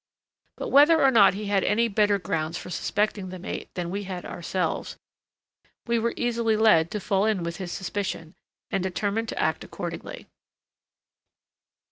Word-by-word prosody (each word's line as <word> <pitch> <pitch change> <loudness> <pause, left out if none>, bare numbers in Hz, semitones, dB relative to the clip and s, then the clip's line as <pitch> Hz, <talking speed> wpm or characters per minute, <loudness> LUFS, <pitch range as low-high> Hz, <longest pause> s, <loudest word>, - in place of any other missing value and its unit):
But - - -4
whether 300 +4 +6
or 270 - +6
not 200 -6 +6
he 210 +1 -5
had 200 -1 +1
any 230 +3 +2
better 210 -1 +2
grounds 165 -2 -2
for - - -8
suspecting 205 +2 -1
the 185 - -7
mate 180 - -6
than 175 -1 -3
we 200 +1 -3
had 185 -2 -6
ourselves, 180 +2 -3 0.9
we 235 -1 +1
were 235 +1 -1
easily 235 -2 +1
led 190 -7 +5
to 210 - -3
fall 195 0 +1
in 205 -5 0
with 170 -1 -4
his 180 -2 -5
suspicion, 190 -4 -4 0.4
and 195 - 0
determined 205 +4 -2
to - - -4
act - - 0
accordingly. - - -7
200 Hz, 160 wpm, -26 LUFS, 180-220 Hz, 0.9 s, whether